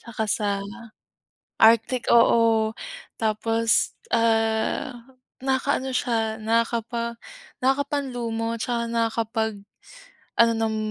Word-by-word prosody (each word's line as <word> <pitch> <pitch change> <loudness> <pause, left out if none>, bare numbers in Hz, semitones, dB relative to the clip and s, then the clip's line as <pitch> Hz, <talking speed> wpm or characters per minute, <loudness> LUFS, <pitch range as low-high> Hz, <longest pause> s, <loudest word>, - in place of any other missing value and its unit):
saka 220 -2 -4
sa, 205 0 0 1.1
Arctic 230 +3 +4
oo. 230 -2 +4 0.5
Tapos, 225 +1 +1 0.2
ah, 225 +2 +1 0.5
nakaka-ano 265 0 0
siya, 225 -3 0
nakakapa 230 +1 -1 0.4
nakaka-panlumo 250 -4 -1
saka 235 0 -1
nakapag-ano 230 - -2
ng 225 -1 -1
230 Hz, 70 wpm, -24 LUFS, 225-240 Hz, 1.1 s, Arctic